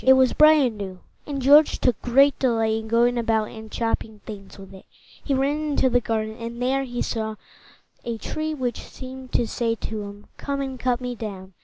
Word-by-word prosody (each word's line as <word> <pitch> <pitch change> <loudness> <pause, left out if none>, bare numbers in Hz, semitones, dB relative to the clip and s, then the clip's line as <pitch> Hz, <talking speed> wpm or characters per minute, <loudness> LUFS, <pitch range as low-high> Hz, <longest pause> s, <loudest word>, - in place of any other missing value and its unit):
It 265 - +7
was 260 -1 +4
bright 310 +1 +7
and 240 -5 0
new, 190 -2 -6 0.3
and 285 -2 -3
George 285 +4 +6
took 250 -4 +1
great 275 +3 +4
delight 225 -4 +2
in 220 0 -3
going 240 +2 +3
about 225 -2 +1
and 220 -1 -10
chopping 225 -2 -2
things 200 -3 -9
with 195 0 -12
it. 190 - -14 0.4
He 275 - 0
ran 275 +3 +1
into 285 -4 +1
the 245 0 +3
garden, 220 -1 -2
and 235 +1 -6
there 265 +2 +1
he 245 -1 -3
saw 220 -2 -3 0.7
a 235 -1 -3
tree 310 +6 -3
which 250 -4 -2
seemed 260 0 -10
to 240 - +2
say 230 0 -1
to 220 -1 -5
him, 205 0 -9
"Come 280 -1 -3
and 265 -2 -4
cut 250 0 0
me 250 0 -3
down!" 195 -5 -7
240 Hz, 205 wpm, -24 LUFS, 220-265 Hz, 0.7 s, It